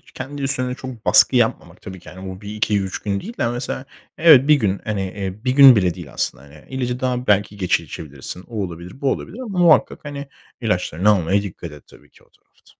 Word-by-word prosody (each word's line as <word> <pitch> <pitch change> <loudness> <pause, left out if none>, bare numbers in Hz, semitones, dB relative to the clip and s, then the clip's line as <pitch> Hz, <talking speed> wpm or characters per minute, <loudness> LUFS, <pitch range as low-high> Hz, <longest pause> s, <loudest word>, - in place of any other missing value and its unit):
kendi 140 +2 -6
üstüne 130 -2 -1
çok 130 -4 -9
baskı - - +5
yapmamak - - -1
tabii 95 -1 -9
ki, - - -13
hani, 95 +1 -8
bu 95 - -9
1-2-3 105 -2 -2
gün 100 -1 -3
değil 230 +4 -9
de 120 - +1
mesela 125 +2 -4 0.3
evet, 150 -4 +7
1 150 - +8
gün 100 -8 0
hani, 105 -2 -2
eee, 95 +3 -6
1 130 - +1
gün 135 -2 +8
bile 90 -4 +1
değil 85 -5 -10
aslında - - -3
yani 75 +1 -17
ilacı 125 -1 -3
daha 125 -1 -2
belki 105 0 +2
geç 90 -3 +1
içebilirsin. 75 +2 -9
O 110 -4 -4
olabilir, 90 +6 -8
bu 135 -2 +1
olabilir 220 - -5
ama 215 -8 -5
muhakkak 165 -5 +4
hani, 145 -1 -6 0.3
ilaçlarını 90 -3 0
almaya 100 +1 +2
dikkat 85 -4 -8
et 75 - -14
tabii 75 - -20
ki - - -23
o - - -34
tarafta. - - -34
105 Hz, 210 wpm, -20 LUFS, 95-130 Hz, 0.3 s, 1